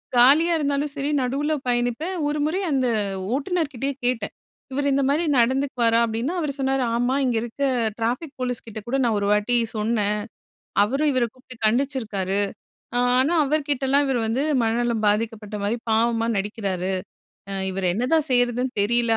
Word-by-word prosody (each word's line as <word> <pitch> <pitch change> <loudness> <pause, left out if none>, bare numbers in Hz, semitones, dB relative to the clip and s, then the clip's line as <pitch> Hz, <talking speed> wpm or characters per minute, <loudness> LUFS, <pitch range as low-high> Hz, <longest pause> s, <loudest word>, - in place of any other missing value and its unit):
காலியா 290 +8 +6
இருந்தாலும் 285 -1 0
சரி 280 +1 -2
நடுவுல 280 +5 0
பயணிப்பேன். 245 +9 0
1 295 +1 -1
முறை 325 +5 0
அந்த 260 -2 +2 0.5
ஓட்டுனர்கிட்டயே 280 -3 -1
கேட்டேன். 245 -4 -1 0.4
இவரு 285 +2 -1
இந்த 275 0 +2
மாரி 290 +5 +2
நடந்துக்குவாரா? 245 -2 +2
அப்பிடினா 230 +8 -2
அவரு 300 -4 -1
சொன்னாரு 270 0 +1
"ஆமா, 245 +2 +1
இங்க 245 -2 +1
இருக்க 240 +4 -4 0.3
டிராபிக் 250 +6 -2
போலீஸ் 250 -2 -2
கிட்ட 220 -1 -6
கூட 265 +3 0
நான் 230 -3 +2
1 200 - -1
வாட்டி 210 +4 +2 0.2
சொன்னேன். 210 -1 0 0.7
அவரும் 275 +8 +1
இவர 255 -2 +2
கூப்பிட்டு 255 0 -14
கண்டிச்சிருக்காரு. 215 -6 0 0.6
ஆ - - +3 0.2
ஆனா, 280 +7 +3
அவர்கிட்டலாம் 285 -1 +1
இவர் 255 -3 +1
வந்து 230 +5 0 0.2
மனநலம் 230 0 0
பாதிக்கப்பட்ட 215 0 -1
மாரி 210 +3 0
பாவமா 230 +1 +2
நடிக்கிறாரு. 195 -2 -2 0.6
அ - - -3 0.2
இவர 190 0 -3
என்னதான் 285 - +1
செய்றதுன்னு 245 +1 +1
தெரியல" 235 +1 +2
245 Hz, 145 wpm, -23 LUFS, 225-280 Hz, 0.7 s, காலியா